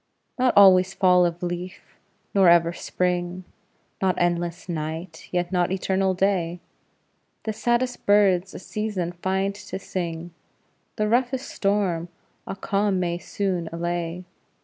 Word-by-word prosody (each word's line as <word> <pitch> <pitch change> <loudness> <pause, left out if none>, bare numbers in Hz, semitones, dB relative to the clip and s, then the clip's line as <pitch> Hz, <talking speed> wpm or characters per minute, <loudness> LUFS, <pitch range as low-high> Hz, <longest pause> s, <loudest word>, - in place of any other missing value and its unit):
Not 255 0 +3
always 190 -2 +7
fall 180 -2 +5
of 170 +1 -6
leaf, 175 +1 -6 0.4
nor 195 -3 +6
ever 170 0 +5
Spring; 180 +1 -2 0.6
Not 185 -2 +2
endless 175 0 -1
night, 160 0 -5
yet 175 0 -1
not 180 -1 +1
eternal 190 0 0
day; 180 -3 0 0.8
The 220 - -2
saddest 240 +3 -1
birds 195 -2 +3
a - - -4
season 195 -2 -3
find 190 +3 -1
to 200 -1 -7
sing; 175 -3 -5 0.6
The 215 -1 0
roughest 250 +3 0
storm 195 -4 0 0.4
a - - -4
calm 195 0 0
may 175 -1 -1
soon 180 -4 -2
allay. 170 +1 -3
180 Hz, 125 wpm, -24 LUFS, 175-195 Hz, 0.8 s, always